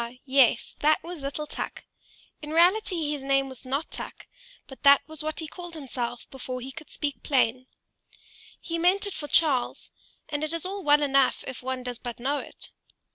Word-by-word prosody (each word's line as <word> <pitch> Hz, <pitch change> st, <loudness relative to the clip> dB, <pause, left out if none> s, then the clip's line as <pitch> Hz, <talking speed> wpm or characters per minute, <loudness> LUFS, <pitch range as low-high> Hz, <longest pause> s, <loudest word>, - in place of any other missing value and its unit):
yes, 260 Hz, -4 st, +3 dB
that 310 Hz, +1 st, +3 dB
was 340 Hz, -2 st, -7 dB
little 280 Hz, +2 st, -3 dB
Tuk: -, -, -5 dB, 0.6 s
in 300 Hz, -, -7 dB
reality 340 Hz, -1 st, +3 dB
his 290 Hz, -2 st, -3 dB
name 275 Hz, 0 st, +2 dB
was 260 Hz, -1 st, -6 dB
not 275 Hz, +5 st, -2 dB
Tuk, -, -, -7 dB, 0.4 s
but 265 Hz, -, -12 dB
that 280 Hz, 0 st, +7 dB
was 315 Hz, -2 st, -3 dB
what 310 Hz, +1 st, -3 dB
he 320 Hz, -, -5 dB
called 350 Hz, +1 st, -9 dB
himself 245 Hz, -5 st, -4 dB
before 255 Hz, -1 st, -5 dB
he 260 Hz, +2 st, -7 dB
could 310 Hz, +3 st, -11 dB
speak 285 Hz, -6 st, -3 dB
plain: 255 Hz, -2 st, +1 dB, 0.9 s
he 335 Hz, 0 st, -3 dB
meant 370 Hz, +4 st, +3 dB
it 405 Hz, -, -4 dB
for 295 Hz, -, -5 dB
Charles, 290 Hz, -6 st, +2 dB, 0.4 s
and 290 Hz, 0 st, -3 dB
it 310 Hz, +1 st, -2 dB
is 335 Hz, +1 st, -2 dB
all 395 Hz, +2 st, -3 dB
well 295 Hz, -1 st, +5 dB
enough 275 Hz, -2 st, +3 dB
if 260 Hz, -, -6 dB
one 260 Hz, 0 st, -3 dB
does 245 Hz, -2 st, -5 dB
but 240 Hz, -1 st, -6 dB
know 280 Hz, +4 st, 0 dB
it. -, -, -11 dB
285 Hz, 185 wpm, -27 LUFS, 260-320 Hz, 0.9 s, that